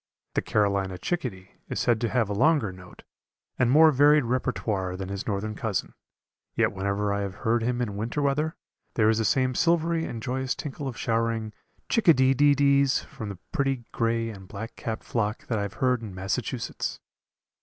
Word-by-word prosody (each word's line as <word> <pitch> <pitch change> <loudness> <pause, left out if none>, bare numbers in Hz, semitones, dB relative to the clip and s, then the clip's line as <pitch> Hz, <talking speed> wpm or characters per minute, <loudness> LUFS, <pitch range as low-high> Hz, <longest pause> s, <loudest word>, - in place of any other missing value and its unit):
The - - +1
Carolina 100 -3 0
chickadee 115 - -4 0.2
is - - -2
said 120 -2 +2
to 115 - +1
have 115 -3 +1
a 105 - -2
longer 130 - +3
note 90 0 -14 0.6
and 125 -2 +3
more 155 +4 +7
varied 145 +1 +5
repertoire 110 -7 -1
than 95 0 -5
his 100 -1 -5
northern 105 +1 -2
cousin, 105 -3 -3 0.6
yet - - +2
whenever 100 +1 -1
I 100 - -1
have 100 -2 -4
heard 115 +1 +3
him 125 +1 0
in 105 -4 -4
winter 115 +7 -3
weather, 150 +3 0 0.4
there 110 -1 +4
is 110 0 +2
the 110 - +1
same 130 +1 +2
silvery 165 +2 +2
and 115 - -5
joyous 130 +2 -2
tinkle 145 -1 -5
of 125 - -5
showering 115 -1 -1 0.3
Chick 230 - 0
a 165 - +9
dee 130 +1 +4
dee 145 +2 +4
dees 140 -1 +3
from 110 - -8
the 100 - -7
pretty 135 -3 0
gray 115 0 0
and 95 -3 -11
black 110 +4 -7
capped 110 -1 -4
flock 110 -1 -2
that 115 -3 -1
I - - -1
have 100 0 -4
heard 125 -2 +1
in 105 -5 -7
Massachusetts. 95 +1 -3
115 Hz, 190 wpm, -26 LUFS, 100-135 Hz, 0.6 s, a